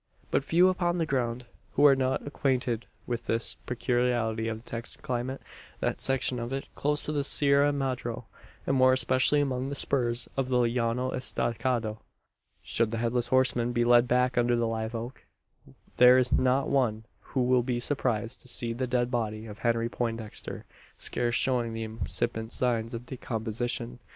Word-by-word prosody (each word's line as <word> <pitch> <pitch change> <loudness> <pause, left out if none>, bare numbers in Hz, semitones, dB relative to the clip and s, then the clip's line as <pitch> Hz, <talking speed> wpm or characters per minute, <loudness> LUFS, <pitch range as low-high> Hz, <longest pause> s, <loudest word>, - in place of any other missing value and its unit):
But - - +2
few 175 +5 +4
upon 180 -1 +1
the 165 - +1
ground 125 -3 -1 0.3
who 145 - +4
are 140 -2 +8
not 130 0 -1
acquainted 125 -4 -1 0.2
with 120 -1 -4
this 115 +1 0
peculiarity 120 -2 0
of 110 -1 -2
the - - -23
Texan 115 +1 -7
climate 130 +2 -3 0.4
that - - -2
section 130 -1 +1
of 120 +1 -4
it 135 0 -3
close 150 +1 0
to - - -2
the 145 -2 0
Sierra 140 0 +4
Madro 125 -4 -3 0.4
and 135 - +1
more 130 0 +5
especially 130 +3 +3
among 130 -1 -1
the 140 - -4
spurs 120 -4 0
of 135 -1 -1
the 125 - +2
Llano 120 +1 0
Estacado. 115 -3 -1 0.6
Should 115 -1 0
the 115 - -2
Headless 120 +1 0
Horseman 125 -1 +2
be 120 -1 +2
led 120 0 +5
back 125 0 +2
under 120 0 +2
the 120 0 +1
live 110 0 -3
oak, 120 +3 -6 0.7
there 125 +1 +8
is 125 0 +2
not 130 +2 +2
one 115 -6 +1 0.3
who 130 - +3
will 125 0 +3
be 120 0 -2
surprised 120 -3 -1
to - - -10
see 120 -1 0
the 130 +2 -2
dead 125 0 0
body 110 -3 -2
of 105 -1 -10
Henry 115 0 +1
Poindexter 115 -2 -5 0.3
scarce 120 -1 0
showing 120 -3 +1
the 115 0 -3
incipient 110 +1 -3
signs 115 -2 0
of 115 +1 -7
decomposition. 120 0 -4
120 Hz, 170 wpm, -28 LUFS, 115-130 Hz, 0.7 s, are